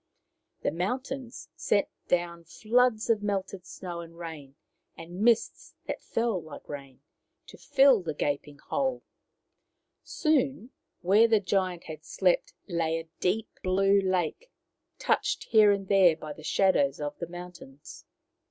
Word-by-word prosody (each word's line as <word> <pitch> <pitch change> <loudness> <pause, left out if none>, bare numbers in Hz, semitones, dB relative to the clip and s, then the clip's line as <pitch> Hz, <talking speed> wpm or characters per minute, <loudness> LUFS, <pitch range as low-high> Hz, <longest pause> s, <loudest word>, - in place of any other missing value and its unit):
The - - +1
mountains 250 - -4
sent 205 - +1 0.2
down 170 -1 0
floods 225 +5 +1
of 215 -2 +1
melted 195 -2 -3
snow, 175 -2 -7
and 165 0 -10
rain, 155 -5 -8 0.4
and 175 +3 -8
mists 230 0 +1
that - - -4
fell 230 -6 -1
like 155 -2 -11
rain, 140 -2 -9 0.4
to - - -13
fill 270 -5 +5
the 160 -4 -4
gaping 145 0 -2
hole. 265 - -2 1.0
Soon 275 -4 0 0.3
where 200 +5 +5
the 220 -2 +4
giant 185 -3 -1
had 155 -1 -9
slept - - 0
lay 165 -3 0
a 165 0 -11
deep 210 +5 0
blue 195 +2 +3
lake, 185 - -1 0.5
touched - - 0
here 215 -2 +5
and 195 -1 -1
there 185 -4 +5
by 155 -1 -7
the 155 - -13
shadows 155 -4 +2
of 145 0 -5
the 170 - -4
mountains. 175 -5 -11
185 Hz, 135 wpm, -28 LUFS, 165-225 Hz, 1.0 s, fill